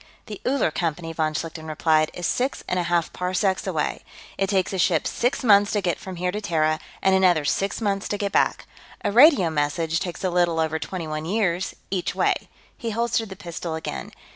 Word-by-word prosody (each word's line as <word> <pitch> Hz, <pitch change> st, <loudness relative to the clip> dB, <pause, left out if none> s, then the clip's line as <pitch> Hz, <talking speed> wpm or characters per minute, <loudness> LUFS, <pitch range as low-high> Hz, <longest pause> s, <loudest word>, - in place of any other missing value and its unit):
"The 210 Hz, -2 st, -8 dB
Uller 260 Hz, -, +2 dB
Company," 165 Hz, 0 st, -2 dB
von 155 Hz, -1 st, -1 dB
Schlichten 160 Hz, 0 st, -5 dB
replied, 155 Hz, 0 st, +2 dB
"is 175 Hz, -, -4 dB
six 255 Hz, +9 st, -1 dB
and 180 Hz, -, 0 dB
a 175 Hz, -, -2 dB
half 170 Hz, -2 st, +1 dB
parsecs 185 Hz, +1 st, 0 dB
away. -, -, -2 dB, 0.3 s
It 195 Hz, -, 0 dB
takes 190 Hz, -1 st, +1 dB
a 190 Hz, -, -2 dB
ship 170 Hz, -3 st, +2 dB
six 245 Hz, +2 st, 0 dB
months 205 Hz, -3 st, +5 dB
to 205 Hz, -, +1 dB
get 175 Hz, -3 st, -1 dB
from 190 Hz, -1 st, -7 dB
here 180 Hz, +1 st, -1 dB
to 210 Hz, -, -4 dB
Terra, 155 Hz, -4 st, +1 dB, 0.2 s
and 190 Hz, -, +4 dB
another 180 Hz, -5 st, +4 dB
six 195 Hz, +9 st, 0 dB
months 200 Hz, -3 st, -1 dB
to 205 Hz, -, -2 dB
get 200 Hz, -1 st, -2 dB
back. -, -, +1 dB, 0.4 s
A -, -, +1 dB
radio 240 Hz, -, +6 dB
message 160 Hz, +2 st, 0 dB
takes 175 Hz, 0 st, -5 dB
a 185 Hz, -, +1 dB
little 175 Hz, -2 st, +2 dB
over 160 Hz, 0 st, 0 dB
twenty 180 Hz, -1 st, -5 dB
one 155 Hz, 0 st, -4 dB
years, 185 Hz, -2 st, 0 dB, 0.2 s
each 185 Hz, -2 st, -1 dB
way." -, -, +3 dB, 0.4 s
He 230 Hz, -, -4 dB
holstered 230 Hz, 0 st, 0 dB
the 190 Hz, -, -7 dB
pistol 170 Hz, -2 st, -5 dB
again. 160 Hz, -, -5 dB
180 Hz, 205 wpm, -24 LUFS, 160-200 Hz, 0.4 s, radio